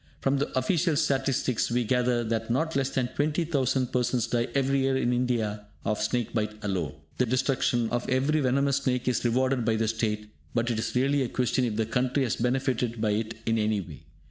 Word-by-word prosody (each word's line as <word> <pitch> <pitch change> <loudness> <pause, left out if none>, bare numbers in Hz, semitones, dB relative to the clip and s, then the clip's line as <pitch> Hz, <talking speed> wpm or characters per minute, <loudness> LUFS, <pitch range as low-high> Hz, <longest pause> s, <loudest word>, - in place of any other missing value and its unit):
From 135 0 +1
the 145 - -1
official 160 +5 +2
statistics, 135 -4 +1
we 120 +1 +1
gather 125 0 +1
that 115 0 -2
not 160 +7 0
less 135 -1 +1
than 125 -3 -1
20,000 145 -4 0
persons 125 -1 +1
die 120 -1 0
every 135 0 +2
year 135 0 +2
in 125 -2 +1
India 110 -4 -1 0.2
of 105 0 0
snake 115 +2 -1
bite 105 -2 -1
alone. 90 -8 -2 0.2
The 125 - +3
destruction 125 -1 +1
of 120 0 -2
every 135 +4 +2
venomous 140 +1 +2
snake 130 -3 -1
is 125 - +1
rewarded 130 +1 +1
by 110 0 +2
the 110 0 0
state, 105 -1 -2 0.2
but 120 +1 +1
it 110 - -1
is 110 - -3
really 135 +3 +2
a 125 - -1
question 125 +1 +1
if 110 -3 -2
the 110 0 +1
country 130 +4 0
has 120 - -1
benefitted 125 -1 0
by 110 -1 +1
it 110 +2 -2
in 115 0 +1
any 105 -1 +1
way. 95 - -10
125 Hz, 200 wpm, -27 LUFS, 115-135 Hz, 0.2 s, The